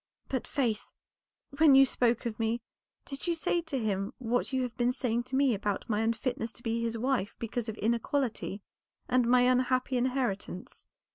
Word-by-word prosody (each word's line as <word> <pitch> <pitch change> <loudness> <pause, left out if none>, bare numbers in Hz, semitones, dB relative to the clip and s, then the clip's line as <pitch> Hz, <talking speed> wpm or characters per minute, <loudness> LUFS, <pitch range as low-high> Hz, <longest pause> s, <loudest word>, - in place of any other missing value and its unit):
But, 260 -3 -2
Faith, 235 -7 -1 0.7
when 305 -4 +7
you 270 0 +8
spoke 240 -2 +1
of 230 -1 -3
me, 225 +1 0 0.5
did 275 +4 -6
you 340 - +2
say 340 +2 0
to 320 -4 -4
him 200 -4 -1
what 245 +2 -1
you 260 -1 +1
have 245 -2 -4
been 245 0 +2
saying 240 -2 -1
to 260 - -4
me 270 -2 +4
about 205 -1 -2
my 215 -2 0
unfitness 230 0 -1
to 235 - -12
be 230 0 -1
his 230 0 -1
wife 235 -4 0
because 230 0 -3
of 220 - -5
inequality, 230 -2 -1 0.4
and 250 -1 +2
my 250 +1 +5
unhappy 255 +1 +2
inheritance?" 245 -7 -2
240 Hz, 180 wpm, -30 LUFS, 225-260 Hz, 0.7 s, you